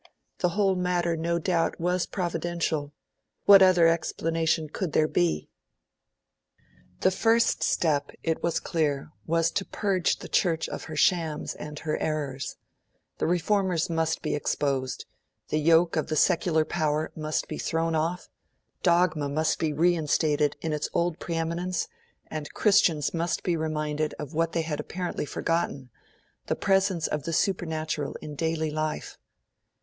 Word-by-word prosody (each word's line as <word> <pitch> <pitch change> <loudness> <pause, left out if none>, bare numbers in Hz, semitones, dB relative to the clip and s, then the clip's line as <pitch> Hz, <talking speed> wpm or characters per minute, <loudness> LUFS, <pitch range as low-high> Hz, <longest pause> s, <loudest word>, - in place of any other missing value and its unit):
The 180 - +2
whole 195 -2 +3
matter, 175 -2 0
no 170 +1 0
doubt, 170 -1 0
was 180 +1 0
Providential 170 -5 -2 0.5
what 200 -1 +9
other 180 -3 +6
explanation 165 -1 0
could 165 +2 -4
there 155 - +4
be? 80 - 0 1.5
The 185 - +4
first 225 +5 +2
step, 145 -4 +1
it 160 -1 -1
was 170 - 0
clear, 150 -3 -1 0.2
was 165 0 +2
to 200 - -1
purge 195 -3 0
the - - -9
Church 165 -4 +1
of - - -6
her 160 - -7
shames 160 -2 +1
and 150 0 -8
her 155 0 -2
errors. 145 -4 -3 0.6
The - - +1
Reformers 180 -1 +1
must 160 -1 0
be - - -1
exposed; 140 -3 -1 0.4
the 155 - +1
yoke 165 +2 +4
of 155 - 0
the 155 - -2
secular 165 -1 +3
power 155 -2 -1
must 155 -1 -2
be - - -5
thrown 165 0 0
off; 165 +3 -1 0.5
dogma 170 -4 +2
must 155 +2 0
be 160 -2 0
reinstated 155 -2 +2
in 160 0 -2
its 150 0 -2
old 170 -1 0
pre 170 - -4
eminence; 170 +2 -1 0.4
and 155 -2 -6
Christians 170 -8 +3
must 170 +1 -1
be 175 - +1
reminded 155 -1 -2
of 150 - -7
what 165 +1 0
they 165 - 0
had 155 -2 -3
apparently 175 +1 -3
forgotten 140 -7 -2 0.6
the - - 0
presence 195 -4 +2
of 150 - -1
the 165 +4 -4
supernatural 160 -5 -1
in 150 - -8
daily 160 +1 -1
life. 155 0 -3
165 Hz, 145 wpm, -27 LUFS, 155-175 Hz, 1.5 s, what